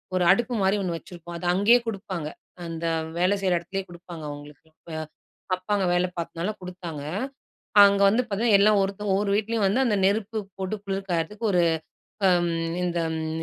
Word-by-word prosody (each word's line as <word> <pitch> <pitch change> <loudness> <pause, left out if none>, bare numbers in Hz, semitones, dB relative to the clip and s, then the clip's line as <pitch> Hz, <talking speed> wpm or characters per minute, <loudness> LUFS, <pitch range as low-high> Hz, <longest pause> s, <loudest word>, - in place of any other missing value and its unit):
ஒரு 180 - +2
அடுப்பு 240 +5 +2
மாரி 190 +1 +3
ஒண்ணு 180 -3 -2
வச்சுருப்போம். 175 0 -10
அத 175 - -7
அங்கேயே 215 +6 +5
கொடுப்பாங்க. 190 -7 -4 0.4
அந்த 165 0 -5 0.3
வேலை 185 +3 +3
செய்ற 185 -2 +2
இடத்துலே 190 +3 -4
கொடுப்பாங்க 175 -2 -10
அவுங்களுக்கு. 145 +1 -10 0.3
அ - - -3 0.6
அப்பா 185 +3 -9
அங்க 195 -2 +1
வேலை 180 +1 +2
பார்த்ததுனால 170 +3 -3
கொடுத்தாங்க. 180 -4 -7 0.8
அங்க 200 0 +4
வந்து 225 +5 +3
பார்த்தீங்கன்னா, 215 0 +3
எல்லாம் 210 0 +5
ஒருத்தவுங்க 200 +1 -2
ஒவ்வொரு 200 0 0
வீட்லயும் 220 0 0
வந்து 205 +7 +2
அந்த 220 -5 +2
நெருப்பு 215 +2 0 0.2
போட்டு 190 +2 -2
குளிர் 195 0 -3
காய்றத்துக்கு 175 +7 -2
ஒரு 180 -1 +4 0.7
அம் 175 -1 +3 0.3
இந்த 175 -1 -1 0.2
ம் 160 0 -3
190 Hz, 165 wpm, -25 LUFS, 170-205 Hz, 0.8 s, அங்கேயே